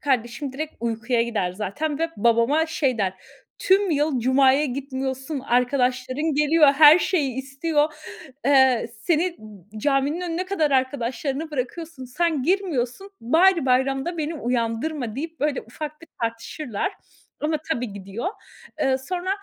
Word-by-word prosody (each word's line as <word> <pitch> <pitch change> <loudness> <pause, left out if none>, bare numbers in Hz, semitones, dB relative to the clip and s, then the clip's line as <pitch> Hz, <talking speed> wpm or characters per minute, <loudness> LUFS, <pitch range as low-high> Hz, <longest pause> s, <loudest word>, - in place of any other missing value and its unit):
kardeşim 255 0 -1
direkt 310 +3 -5
uykuya 235 +1 0
gider 210 -6 -1
zaten 220 +11 -3
ve 330 0 -1
babama 235 +8 +3
şey 275 -6 0
der: 190 -3 +1 0.5
"Tüm 390 0 +3
yıl 295 -3 +1
cumaya 265 +3 +4
gitmiyorsun, 265 +1 -4
arkadaşların 255 +4 0
geliyor, 300 +2 +4
her 300 +3 +8
şeyi 330 -8 0
istiyor, 295 +4 0 0.5
eee, 265 -4 +4
seni 340 +4 +1
n 210 -1 -12
caminin 285 +6 +1
önüne 355 +1 -2
kadar 325 -6 0
arkadaşlarını 265 +3 -1
bırakıyorsun, 290 +1 -5
sen 305 +2 0
girmiyorsun, 350 -2 -1
bari 335 +7 +4
bayramda 270 +6 +1
beni 315 +1 -2
uyandırma!" 240 0 -2
deyip 325 +4 -6
böyle 290 -1 0
ufak 300 +7 -8
bir 330 - -13
tartışırlar. 230 - -3 0.5
Ama 310 +1 0
tabii, 245 -7 -2
gidiyor. 200 - -5 0.5
Eee, 265 -1 +2
sonra, 355 +7 -4
275 Hz, 130 wpm, -23 LUFS, 245-315 Hz, 0.5 s, her